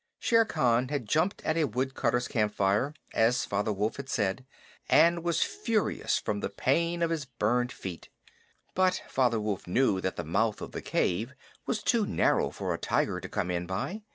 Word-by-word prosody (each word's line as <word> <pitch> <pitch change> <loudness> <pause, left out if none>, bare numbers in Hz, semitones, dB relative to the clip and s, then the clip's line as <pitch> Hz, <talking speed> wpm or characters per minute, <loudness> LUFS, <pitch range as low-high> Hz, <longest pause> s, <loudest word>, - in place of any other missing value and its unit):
Shere 230 -1 +3
Khan 125 - +2
had 140 -5 -3
jumped 160 - +1
at 160 - 0
a 160 - +3
woodcutter's 125 0 -1
campfire, 105 +3 +1 0.2
as 120 +2 +2
Father 100 +2 -1
Wolf 105 +2 -1
had 140 -1 -7
said, 120 +1 -1 0.4
and 170 0 +5
was 170 -2 +2
furious 230 - 0
from 105 -1 -2
the - - -3
pain 170 +5 0
of 165 - +1
his 160 -4 -2
burned 120 0 0
feet. 90 -3 -8 0.6
But 185 0 +2
Father 125 -4 +1
Wolf 105 -4 -3
knew 95 -1 +2
that 95 - -2
the 85 - -4
mouth 105 +7 0
of - - -7
the - - -5
cave 110 +10 -1 0.3
was 220 -4 -1
too 225 -4 +2
narrow - - +2
for - - -3
a - - -4
tiger - - 0
to - - -8
come 90 - -2
in 90 0 -2
by. 100 - -3
125 Hz, 180 wpm, -29 LUFS, 105-165 Hz, 0.6 s, and